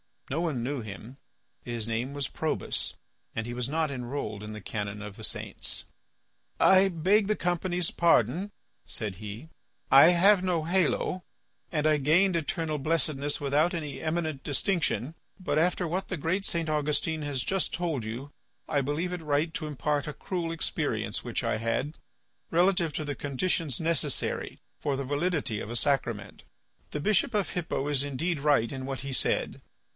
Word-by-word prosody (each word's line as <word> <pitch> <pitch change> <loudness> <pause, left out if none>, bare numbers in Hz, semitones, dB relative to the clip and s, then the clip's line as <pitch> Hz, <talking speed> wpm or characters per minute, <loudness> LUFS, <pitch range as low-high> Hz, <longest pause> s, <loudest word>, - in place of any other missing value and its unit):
No 155 +5 0
one 150 -9 -1
knew 140 +2 -1
him. 110 +5 -9 0.5
His 115 -2 -2
name 120 +4 -1
was 145 -2 -1
Probus, 160 - -1 0.4
and 115 - -1
he 120 - -4
was 125 0 -1
not 155 0 0
enrolled 125 -5 -4
in 105 0 -6
the 110 - -7
canon 105 +1 -4
of 105 -1 -7
the - - -2
saints. - - -4 0.8
"I 190 +1 +7
beg 190 +4 +3
the 215 - +2
company's 175 -1 0
pardon," 170 - +3 0.4
said 105 -4 -3
he, 105 - -8 0.4
"I 140 +6 +9
have 190 +3 +6
no 180 -4 +1
halo, 180 +1 +1 0.5
and 150 -2 0
I 155 -1 +5
gained 170 +6 +4
eternal 160 -1 -1
blessedness 150 -1 0
without 145 +4 +2
any 150 -5 -4
eminent 155 -3 -1
distinction. 155 - 0 0.3
But 150 -5 +1
after 180 +2 +2
what 185 +4 -2
the 185 - -3
great 180 +6 0
St. 165 -2 0
Augustine 150 +1 0
has 140 -3 -1
just 190 -1 0
told 160 -9 -1
you 125 +6 -5 0.4
I 145 - +2
believe 150 +6 -1
it 180 - -4
right 150 +1 +1
to 155 - -3
impart 150 0 -1
a 150 - -3
cruel 170 +2 -3
experience, 165 - -1
which - - -2
I - - +1
had, 115 +7 -1 0.5
relative 175 -1 +3
to 155 - -2
the 145 -1 -3
conditions 145 0 -1
necessary 165 -2 -1 0.2
for 140 - 0
the 140 - -2
validity 145 - 0
of 105 - -6
a 120 - -4
sacrament. 115 -7 0 0.5
The 150 - -3
bishop 215 +6 +2
of 205 -3 +1
Hippo 165 -5 -2
is 140 -2 +2
indeed 145 +4 -1
right 140 -6 +3
in 130 -1 -5
what 135 -3 -3
he 140 0 -5
said. - - 0
150 Hz, 170 wpm, -29 LUFS, 135-170 Hz, 0.8 s, I